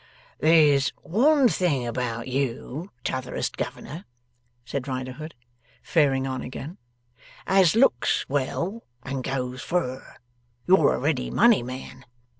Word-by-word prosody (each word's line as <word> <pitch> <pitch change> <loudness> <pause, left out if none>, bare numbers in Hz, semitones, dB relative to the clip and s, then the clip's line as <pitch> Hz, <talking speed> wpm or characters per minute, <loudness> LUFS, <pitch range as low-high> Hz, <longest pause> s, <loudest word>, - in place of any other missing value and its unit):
'There's 150 -4 +5
one 270 - +4
thing 160 - 0
about 120 -1 -3
you, 135 +5 -3
T'otherest 130 -1 -3
Governor,' 165 +7 -6 0.6
said 135 +1 -4
Riderhood, 130 +4 -5 0.5
faring 135 -5 +2
on 130 -1 -3
again, 135 +7 -8 0.7
'as 190 -2 +4
looks 225 - +3
well 170 - -2 0.2
and 135 -1 -4
goes 130 -1 -3
fur. 130 -8 -3 0.5
You're 180 -5 +5
a - - -3
ready 135 -1 0
money 235 - +4
man. 130 +1 -8
140 Hz, 110 wpm, -25 LUFS, 130-170 Hz, 0.7 s, There's